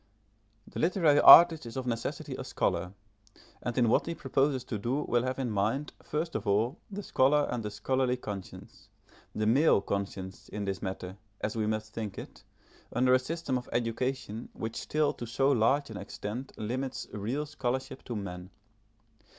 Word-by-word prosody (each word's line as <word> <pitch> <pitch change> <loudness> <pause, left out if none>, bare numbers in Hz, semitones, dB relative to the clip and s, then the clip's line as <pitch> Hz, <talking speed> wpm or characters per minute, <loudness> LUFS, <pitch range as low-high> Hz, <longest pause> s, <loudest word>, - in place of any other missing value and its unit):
* 105 0 -39
The - - -4
literary 165 -4 +4
artist 165 -6 +9
is 115 - -7
of 130 - -3
necessity 115 -2 -3
a - - -5
scholar, 90 +1 -1 0.7
and 120 0 -4
in 120 -2 +4
what 115 - +2
he. 170 - -2
proposes 135 -2 0
to 110 -4 -4
do 125 +8 -1
will 120 - +1
have 130 +1 -2
in 130 -4 -2
mind, 110 +9 -1
first 160 +2 -3
of 105 - -3
all, 110 - +1
the 205 0 -6
scholar 145 -1 +3
and 120 -1 -2
the 105 - -4
scholarly 130 +3 0
conscience 100 -6 -9 0.5
the 110 - 0
male 135 +4 +5
conscience 100 -1 -5
in 105 -1 -4
this 95 -1 -3
matter, 95 0 -5 0.2
as 105 - -2
we 110 -1 0
must 110 0 -3
think 105 -3 -5
it, - - -9 0.5
under 125 +2 +3
a 130 - +6
system 130 -1 -2
of 125 - -13
education 120 -1 -2
which 110 0 -5
still 155 -1 0
to 120 - -7
so 135 +5 +2
large 135 +2 +2
an 105 - -6
extent 105 +6 -6
limits 130 +5 -3
real 115 +9 -2
scholarship 130 -2 -3
to 120 - -4
men. 90 -3 -6
120 Hz, 175 wpm, -30 LUFS, 105-135 Hz, 0.7 s, artist